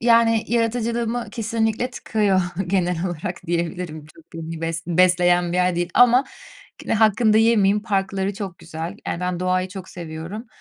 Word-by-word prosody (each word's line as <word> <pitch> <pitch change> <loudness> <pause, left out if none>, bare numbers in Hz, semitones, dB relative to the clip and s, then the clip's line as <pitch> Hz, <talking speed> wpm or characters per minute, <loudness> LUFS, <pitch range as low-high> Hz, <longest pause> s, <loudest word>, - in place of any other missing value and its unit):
Yani, 230 -1 +4
yaratıcılığımı 235 0 -1
kesinlikle 225 +1 -1
tıkıyor, 210 -6 +1 0.3
genel 180 -1 0
olarak 175 +1 -5
diyebilirim. 170 -2 -3
Çok 315 - -18
beni 165 0 -6
bes 165 0 -3
besleyen 175 0 +3
bir 180 - 0
yer 180 -1 +2
değil 175 0 0
ama 245 +2 +6 0.6
yine - - 0
hakkını 215 0 +4
da 215 - +5
yemeyeyim, 210 -3 +3
parkları 195 -2 -1
çok 195 -4 -6
güzel. 165 +4 -6
Yani, 170 - -3
ben 180 -1 -2
doğayı 185 0 0
çok 190 -1 -9
seviyorum. 170 +6 -7
190 Hz, 155 wpm, -22 LUFS, 175-225 Hz, 0.6 s, ama